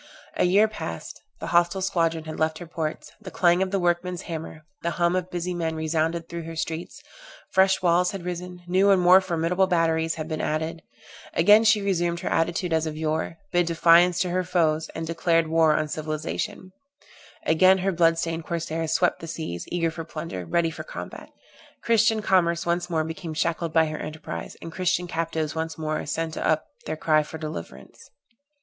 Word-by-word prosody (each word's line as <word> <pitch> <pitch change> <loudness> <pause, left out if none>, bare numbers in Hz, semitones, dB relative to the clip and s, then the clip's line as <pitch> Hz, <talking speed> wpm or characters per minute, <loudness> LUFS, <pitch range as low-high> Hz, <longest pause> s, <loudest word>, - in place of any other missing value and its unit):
A - - +2
year 200 +5 +5
passed, 85 - -7 0.2
the - - -5
hostile 175 +2 +3
squadron 165 -3 0
had 155 0 -7
left 160 0 +1
her 175 - -8
ports, 160 -2 -5
the 200 - -8
clang 175 0 +3
of 190 - +1
the 200 - 0
workman's 175 0 0
hammer, 160 -1 -7 0.2
the 170 - -1
hum 170 0 +2
of 185 -1 -2
busy 180 0 -3
men 165 -2 -2
resounded 160 +1 -1
through 170 0 -5
her 165 0 -7
streets, 160 +1 -5 0.5
fresh 190 0 +3
walls 180 +1 +3
had 195 -3 -6
risen, 180 0 -6
new 190 +3 +3
and 195 -2 +5
more 180 +1 +7
formidable 180 +1 +1
batteries 165 -2 +1
had 155 -1 -5
been 155 -1 -3
added; 160 +2 -2 0.5
again 205 +6 +6
she 215 -2 +4
resumed 175 -3 0
her - - -2
attitude 170 +1 0
as 160 0 +1
of 155 -1 -5
yore, 160 +1 -2
bid 175 -1 +2
defiance 170 +1 +5
to 180 - 0
her 185 +1 0
foes, 160 -3 +1
and 165 - -3
declared 165 0 +1
war 160 -1 +4
on 155 - 0
civilization: 155 +4 -4 0.7
again 185 +4 +5
her 190 +1 0
blood 165 -2 +3
stained 165 0 -2
corsairs 165 -1 -3
swept - - +2
the 165 - -8
seas, 155 - -5
eager 165 -2 0
for 165 0 -6
plunder, 155 - -6
ready 165 - +1
for - - -7
combat; - - -8 0.5
Christian 225 -1 +3
commerce 170 -3 +2
once 175 +1 -1
more 160 -2 +1
became 160 0 -6
shackled 165 +1 -1
by 160 0 +4
her 155 0 -4
enterprise, 150 - -7
and 165 - -7
Christian 180 0 0
captives 165 -2 -2
once 160 0 -4
more 155 -1 -2
sent 160 +1 -2
up 155 0 +1 0.2
their 155 - -3
cry 155 -1 +3
for 150 +1 -8
deliverance. 85 - -8
165 Hz, 185 wpm, -25 LUFS, 160-180 Hz, 0.7 s, more